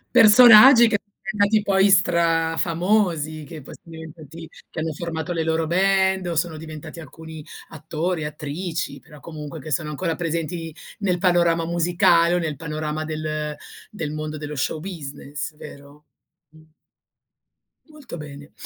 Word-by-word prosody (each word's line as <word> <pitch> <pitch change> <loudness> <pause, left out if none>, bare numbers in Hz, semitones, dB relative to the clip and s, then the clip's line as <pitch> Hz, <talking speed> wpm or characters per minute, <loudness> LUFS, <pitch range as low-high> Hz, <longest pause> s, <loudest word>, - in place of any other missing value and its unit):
Personaggi 235 +2 +8
che 205 -3 0 0.2
diventati 205 +2 +1
poi 195 0 +3
strafamosi, 165 -1 +1
che 155 -2 -10
poi - - -11
son 165 - -16
diventati 160 0 -11 0.2
che - - -7
hanno 160 0 -3
formato 170 +2 -4
le 165 - -2
loro 160 0 0
band 190 +2 +1
o 170 - -3
sono 165 0 -1
diventati 155 +1 -9
alcuni 160 +1 -11 0.3
attori, 160 +2 -4
attrici, 155 +4 -5
però 150 -3 -16
comunque 155 0 -8
che 155 +2 -9
sono 150 +2 -1
ancora 165 +3 -2
presenti 165 0 -4 0.3
nel 185 -3 0
panorama 170 -2 +2
musicale 170 0 +2
o - - +2
nel 160 -4 -3
panorama 155 0 -4
del 155 -1 -4 0.3
del 165 -9 -5
mondo 155 0 -5
dello 150 0 -7
show 150 +3 -2
business, 150 -4 -7
vero? 145 0 -13 0.4
Mh. 155 +1 -19 1.3
Molto 300 - -11
bene. 145 -1 -11
165 Hz, 140 wpm, -22 LUFS, 155-180 Hz, 1.3 s, Personaggi